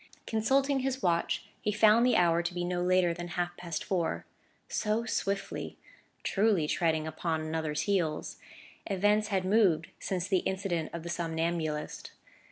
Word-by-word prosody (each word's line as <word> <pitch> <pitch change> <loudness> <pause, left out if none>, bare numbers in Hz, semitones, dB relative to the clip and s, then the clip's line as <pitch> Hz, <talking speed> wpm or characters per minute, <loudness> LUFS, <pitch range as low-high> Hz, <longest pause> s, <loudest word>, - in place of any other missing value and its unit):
Consulting 270 +5 +2
his 265 0 -2
watch, 170 -2 +1 0.2
he 210 - 0
found 215 +2 +5
the 250 - +3
hour 170 -1 +4
to 170 +1 -3
be 175 - -1
no 175 0 -1
later 180 -1 +3
than 175 0 -6
half 175 0 -2
past 170 -2 -4
four: 185 -4 -1 0.4
so 215 +2 0
swiftly 200 -3 -2 0.5
(truly 200 -6 +2
treading 160 -1 +1
upon 160 0 -2
one 155 - -5
another's 155 -2 -1
heels) 175 -7 -1 0.5
events 205 +2 +2
had 190 -3 0
moved 185 -6 +3
since 185 -1 -2
the 190 -2 +3
incident 185 -4 -2
of 170 -1 -6
the 170 - -6
somnambulist. 165 -2 -2
180 Hz, 155 wpm, -30 LUFS, 165-205 Hz, 0.5 s, found